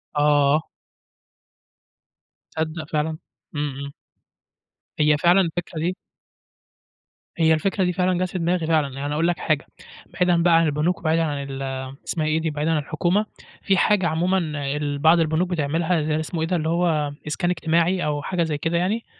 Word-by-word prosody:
آه. 145 0 +3 1.9
تصدق 160 0 -3
فعلًا، 155 +1 -1 0.4
إمم، 145 0 -1
إمم. 140 0 -6 1.1
هي 150 0 +4
فعلًا 175 +5 +4
الفكرة 170 -1 -3
دي 175 +3 -1 1.4
هي 160 -1 +4
الفكرة 190 +4 0
دي 180 - +1
فعلًا 180 0 +1
جات 185 - 0
في 185 - -4
دماغي 170 -1 0
فعلًا، 155 -4 +1
يعني 145 +1 -3
هاقول 165 +3 +1
لك 175 - 0
حاجة، 155 -3 0 0.5
بعيدًا 175 -2 +2
بقى 170 -1 +5
عن 165 - +4
البنوك، 155 +4 0
وبعيدًا 165 0 +1
عن 145 -3 -2
ال 135 0 -6 0.5
اسمها 155 -2 -1
إيه 160 +1 +1
دي، 160 - -1
بعيدًا 150 +2 -1
عن 160 - +2
الحكومة، 175 +8 0 0.4
في 195 -1 +2
حاجة 195 -1 +3
عمومًا 175 +4 +1 0.4
ال 145 -1 -2
بعض 160 +3 +5
البنوك 165 +3 +1
بتعملها 155 -1 0
اسمه 160 +1 -4
إيه 160 - 0
ده، 180 - 0
اللي 160 -1 -1
هو 160 -4 +1
إسكان 175 +4 -1
اجتماعي 170 +1 +1
أو 145 -1 -1
حاجة 175 +3 -1
زي 155 -2 -2
كده 165 +3 -1
يعني، 205 +6 -1
160 Hz, 165 wpm, -23 LUFS, 150-175 Hz, 1.9 s, بقى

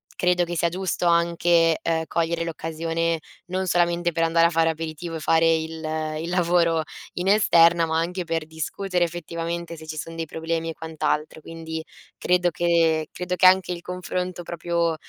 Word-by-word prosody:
credo 180 0 +2
che 175 0 -5
sia 170 +1 +1
giusto 185 0 -2
anche, 170 -1 +3
ehm, 160 -1 0
cogliere 170 0 -1
l'occasione 165 0 -2 0.3
non 185 +1 -2
solamente 175 0 +2
per 165 +1 +1
andare 165 0 +4
a - - -1
fare 165 0 +3
aperitivo, 160 +1 -5
e - - -7
fare 165 +1 +3
il 160 0 -3 0.4
il 170 - -4
lavoro 170 -2 +2 0.3
in 180 +1 -2
esterna 170 -5 +5
ma 160 0 -1
anche 180 +2 -2
per 165 -1 -2
discutere 175 +3 -2
effettivamente 170 0 -4
se 160 -1 -11
ci 155 - -6
son 165 +2 -6
dei 165 0 -3
problemi 165 +1 -3
e 165 - -4
quant'altro, 155 -1 -3
quindi 160 0 -6 0.3
credo 180 0 +2
che 165 -1 +2
credo 180 0 -3
che 185 - +3
anche 185 -1 +4
il 170 - -7
confronto 180 0 -4
proprio, 170 -1 -1
170 Hz, 170 wpm, -24 LUFS, 165-175 Hz, 0.4 s, esterna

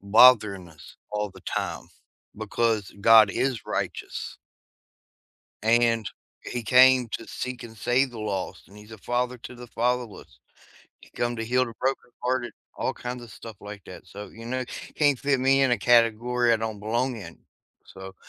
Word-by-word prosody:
bothering 100 -3 +5
us 75 -4 -15
all 105 -1 -2
the - - -16
time - - -4 0.5
because 110 -1 -1
God 110 -1 +7
is 130 0 -2
righteous. - - -4 1.3
And 115 -1 +3 0.4
he 120 -1 -4
came 125 +2 +6
to 115 - -5
seek 125 0 -5
and 115 -1 -11
save 125 +5 +1
the 120 - -10
lost, 100 -3 -4
and 100 - -17
he's 105 +2 -14
a 110 - -10
father 125 +3 -1
to 125 - -10
the 120 0 -10
fatherless. 120 -1 -3 0.6
He - - -18
come 120 0 -2
to 115 - -3
heal 125 +2 +1
the 115 - -9
brokenhearted, 125 -1 -2 0.2
all - - -2
kinds 125 0 -6
of 120 - -11
stuff 110 +1 -10
like 105 -1 -10
that, 90 - -12
so, 105 +1 -9
you 115 +1 -11
know, 130 +1 -2 0.3
can't 145 -3 +2
fit 140 0 +1
me 135 +1 +4
in 130 - +3
a 120 - +2
category 120 0 +3
I 115 - +4
don't 110 -2 -4
belong 120 +4 -1
in, 85 -6 -10 0.5
so 95 0 -11
115 Hz, 165 wpm, -26 LUFS, 105-125 Hz, 1.3 s, God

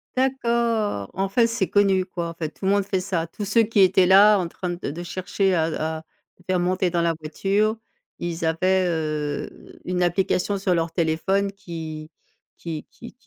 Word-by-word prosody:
D'accord. 235 - 0
En 195 0 -1
fait, 230 +3 +3
c'est 230 -5 -1
connu, 195 -2 +3
quoi, 170 -2 -4
en - - -7
fait, 165 -2 -4
tout 190 - -9
le 195 - +3
monde 200 0 +3
fait 190 -2 -1
ça. 175 -4 -2
Tous 205 +4 -6
ceux 225 +3 +3
qui 210 -2 +2
étaient 185 -1 +5
là 205 +2 +7
en 175 - -1
train 180 +1 -5
de 175 -4 -4
de 170 +4 -6
chercher 185 +2 -1
à 160 -1 -1
à 155 - -9 0.3
te 180 - -24
faire 185 -1 +1
monter 185 +1 +1
dans 170 0 0
la 170 -1 +2
voiture, 200 +8 0 0.4
ils 170 -1 -3
avaient, 185 +3 +2
heu, 155 -3 -4
une 180 0 -1
application 190 +2 +1
sur 190 -2 0
leur 165 -1 0
téléphone 190 +4 0
qui 160 -5 -7 0.5
qui 160 -3 -6
qui 235 - -12
185 Hz, 190 wpm, -23 LUFS, 165-200 Hz, 0.5 s, là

